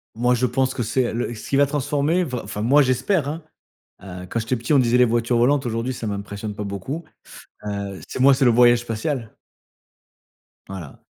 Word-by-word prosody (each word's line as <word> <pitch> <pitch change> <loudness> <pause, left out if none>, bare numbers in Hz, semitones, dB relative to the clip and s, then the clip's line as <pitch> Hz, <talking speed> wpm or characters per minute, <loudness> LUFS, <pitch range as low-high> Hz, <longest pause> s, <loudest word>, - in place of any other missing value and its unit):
Moi 125 +2 +2
je 125 - +1
pense 130 +2 0
que 120 - -1
c'est, 125 +3 0
heu, - - -4
le 120 +1 -2
ce 110 - -9
qui - - +1
va 140 +1 +5
transformer, 145 +4 0
va 125 -6 -4
enfin, 105 0 -5
moi, 140 +6 +5
j'espère, 140 +5 +1
hein, 155 +3 -4 0.6
heu, 90 -2 -8
quand 115 - -1
j'étais 115 +3 -1
petit 120 +6 -1
on 140 - +6
disait: 125 -1 +3
«Les 125 - +6
voitures 120 +1 +1
volantes», 135 +3 +2
aujourd'hui 115 +2 -2
ça 120 - -6
m'impressionne 100 +1 -5
pas 105 - -4
beaucoup, 100 - -5 0.6
heu, 100 -1 -4
c'est - - -5
moi, 135 +2 +7
c'est 135 - +1
le - - +6
voyage 120 0 +5
spatial. 115 +1 -4 1.3
Voilà. 90 -7 -9
120 Hz, 205 wpm, -22 LUFS, 110-135 Hz, 1.3 s, moi